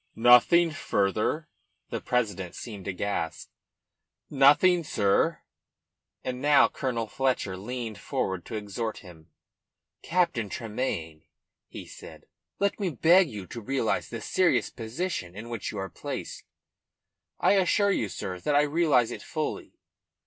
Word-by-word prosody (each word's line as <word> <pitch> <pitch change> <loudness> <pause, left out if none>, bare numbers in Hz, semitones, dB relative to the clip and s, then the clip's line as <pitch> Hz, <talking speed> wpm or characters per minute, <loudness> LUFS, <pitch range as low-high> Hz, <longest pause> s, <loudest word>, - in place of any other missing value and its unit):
"Nothing 125 +9 +6
further?" 110 - 0 0.4
The - - -3
president 100 -8 -1
seemed 105 -6 -8
aghast. 95 -4 -3 0.8
"Nothing, 150 +6 +5
sir." 100 -9 +1 0.8
And 125 0 -4
now 145 0 +6
Colonel 120 -4 -3
Fletcher 125 -5 -1
leaned 110 +1 -6
forward 95 -1 -2
to 115 - -5
exhort 110 +1 -4
him. 80 -2 -14 0.7
"Captain 165 - 0
Tremayne," 90 -9 -4 0.4
he - - -9
said, - - -12 0.3
"let 200 +1 0
me 195 -3 0
beg 170 +4 +4
you 105 -5 -7
to 115 +6 -8
realise 130 0 -1
the - - -6
serious - - +1
position 115 - -4
in 110 +3 -8
which 115 -3 -4
you 105 - -7
are 95 0 -3
placed." - - -7 0.9
"I - - +4
assure 200 +1 +3
you, 110 - 0
sir, 90 -1 -5
that 145 +10 0
I 145 - +5
realise 150 -6 +2
it - - -6
fully." - - -4
115 Hz, 130 wpm, -27 LUFS, 100-150 Hz, 0.9 s, Nothing